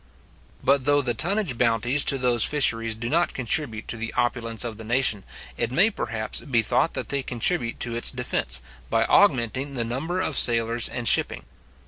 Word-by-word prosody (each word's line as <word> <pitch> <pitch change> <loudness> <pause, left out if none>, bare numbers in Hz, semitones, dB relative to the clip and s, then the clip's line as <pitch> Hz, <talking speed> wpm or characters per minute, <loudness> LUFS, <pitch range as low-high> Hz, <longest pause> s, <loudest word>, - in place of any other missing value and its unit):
But 135 -1 +2
though 145 0 +2
the 120 -2 -2
tonnage 175 - -2
bounties 120 +4 +1
to 135 - +4
those 125 -2 +2
fisheries 115 -6 +3
do 115 +2 -6
not 170 +7 0
contribute 120 -2 -2
to 120 - -4
the 115 0 -5
opulence 115 -2 -1
of 115 -3 -6
the - - -8
nation, 115 -3 0 0.3
it 115 - -2
may, 185 - +3
perhaps, 110 - -4
be 120 -5 0
thought 160 - 0
that - - -5
they 140 -1 -1
contribute 125 +1 -2
to 120 - -3
its 120 - +4
defence, 65 - -2 0.3
by - - +1
augmenting 130 +3 +1
the 120 -2 -2
number 150 +10 -4
of - - +1
its - - +4
sailors 115 0 +4
and 120 -2 -5
shipping. - - +2
120 Hz, 185 wpm, -23 LUFS, 115-140 Hz, 0.3 s, to